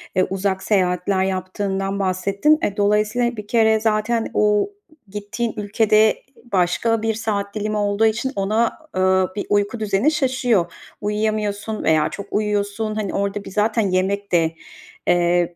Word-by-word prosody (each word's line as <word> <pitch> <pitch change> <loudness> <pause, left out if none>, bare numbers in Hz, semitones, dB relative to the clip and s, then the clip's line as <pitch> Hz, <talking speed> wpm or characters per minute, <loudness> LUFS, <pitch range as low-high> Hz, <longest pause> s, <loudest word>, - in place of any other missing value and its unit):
eee, 185 - +4
uzak 190 0 -1
seyahatler 185 -1 +1
yaptığından 195 +1 -2
bahsettin. 195 - +2
Eee, 200 - -1
dolayısıyla 210 +4 +1
bir 210 -1 -7
kere 220 -1 +3
zaten 220 +1 0
o 210 - +2 0.4
gittiğin 210 +3 -4
ülkede 215 +1 +3 0.4
başka 200 +5 +1
bir 225 0 0
saat 210 -2 -3
dilimi 215 0 -2
olduğu 205 +1 +1
için 235 +4 0
ona, 215 +4 +1 0.2
eee, 185 0 +3
bir 205 - -3
uyku 205 +3 +1
düzeni 215 +7 +1
şaşıyor. 250 - +1 0.3
Uyuyamıyorsun 210 0 -2
veya 155 -1 +3
çok 200 - -7
uyuyorsun. 210 +1 -1
Hani, 210 -3 -3
orada 200 +1 -2
bir - - -8
zaten 215 +2 +1
yemek 195 +2 -1
de, 165 -1 +2 0.5
eee, 175 0 +2
205 Hz, 140 wpm, -21 LUFS, 190-220 Hz, 0.5 s, eee